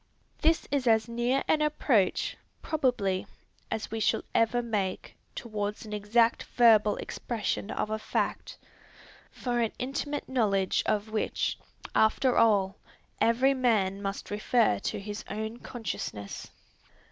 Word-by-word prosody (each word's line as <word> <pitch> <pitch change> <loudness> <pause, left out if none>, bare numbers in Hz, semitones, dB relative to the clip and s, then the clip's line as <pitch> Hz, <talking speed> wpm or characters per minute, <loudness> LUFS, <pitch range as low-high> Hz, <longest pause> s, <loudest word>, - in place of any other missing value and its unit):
This 325 +1 +2
is 275 -3 0
as 220 -1 +4
near 240 +3 0
an 305 - +3
approach, 270 -10 +1 0.3
probably, 240 -11 0 0.4
as 220 - -4
we 225 - -2
shall - - +1
ever 240 +2 +2
make, 205 -5 -3 0.2
towards 210 -2 -4
an 210 - -7
exact 225 +3 +2
verbal 215 -3 +6
expression 220 -3 -3
of 215 - -2
a 215 - -1
fact, - - -2 0.7
for 245 -1 -2
an 230 -2 +1
intimate 285 +3 -3
knowledge 200 -7 +1
of 215 +1 0
which, 215 - -1 0.3
after 245 +4 +3
all, 195 -4 +3 0.4
every 255 +4 +4
man 210 -7 +1
must 195 0 -4
refer 210 - +2
to - - -3
his 205 +1 -6
own 220 +2 -4
consciousness. 150 - -6
220 Hz, 125 wpm, -29 LUFS, 205-245 Hz, 0.7 s, verbal